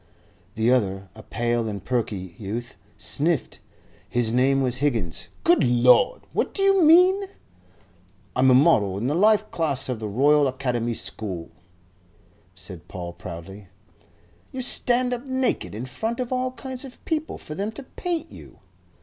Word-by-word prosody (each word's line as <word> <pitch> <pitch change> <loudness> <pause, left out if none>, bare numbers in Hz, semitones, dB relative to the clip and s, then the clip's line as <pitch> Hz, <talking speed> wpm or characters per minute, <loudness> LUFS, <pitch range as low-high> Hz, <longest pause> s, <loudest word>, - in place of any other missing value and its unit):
The 110 +2 +2
other, 95 -6 0
a 110 - -12
pale 120 0 -1
and 100 -3 -6
perky 105 -8 -2
youth, 115 +4 -5 0.2
sniffed. 155 -1 0 0.5
His 120 -2 0
name 135 +2 +3
was 125 -1 0
Higgins. 95 - -2
"Good 175 -1 +4
Lord! 125 - +4
What - - -1
do 390 - 0
you 390 -1 +4
mean?" 365 +5 +6 1.1
"I'm 130 +1 +4
a 130 - +6
model 110 - +4
in 105 - -3
the 140 - +1
life 215 +4 +3
class 140 -6 0
of 125 -3 -2
the 110 - -4
Royal 140 +7 +3
Academy 125 -3 -2
School," 95 -8 -5 1.0
said 90 -3 -9
Paul, 85 -1 -7
proudly. 90 +3 -9 0.8
"You 260 -1 -4
stand 250 0 +1
up 245 0 -4
naked 260 - -1
in 115 +4 -5
front 225 - -4
of 250 0 -2
all 255 0 0
kinds 255 +1 -6
of 265 -2 -12
people 315 -1 -2
for 150 - -9
them 200 +7 -3
to 275 - -9
paint 330 +3 -4
you?" - - -13
130 Hz, 155 wpm, -24 LUFS, -, 1.1 s, mean